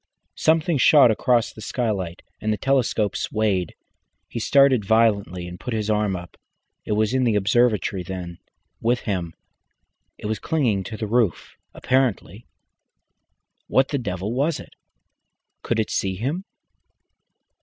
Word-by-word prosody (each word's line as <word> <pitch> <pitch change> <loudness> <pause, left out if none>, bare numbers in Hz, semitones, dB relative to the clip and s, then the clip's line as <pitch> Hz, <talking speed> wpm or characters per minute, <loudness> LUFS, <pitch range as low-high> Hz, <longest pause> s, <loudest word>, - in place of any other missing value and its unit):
Something 160 -1 +2
shot 140 -3 +7
across 120 +1 +1
the 110 - -11
skylight, 100 -8 -3 0.2
and 110 - 0
the 105 - 0
telescope 125 -6 +1
swayed. 100 -5 -1 0.5
He - - -5
started 135 -1 +4
violently 100 -4 +1
and 90 0 -9
put 125 -2 -4
his 110 0 -1
arm 105 -2 +1
up. 85 -1 -9 0.5
It - - -1
was 110 +2 +1
in 130 0 +2
the 115 -3 +2
observatory, 105 -1 +2
then, 90 -1 -7 0.4
with 120 +2 +1
him. 90 -6 -3 0.8
It - - -10
was 110 -1 -2
clinging 125 - 0
to 110 - -6
the 110 - -3
roof 110 -4 0 0.2
apparently. 120 -5 -1 1.2
What 135 0 +2
the 140 - -1
devil 100 -1 -3
was 145 +5 0
it? - - -12 0.9
Could 115 - -1
it 110 - -1
see 95 -1 -1
him? 145 - -3
110 Hz, 140 wpm, -23 LUFS, 100-125 Hz, 1.2 s, shot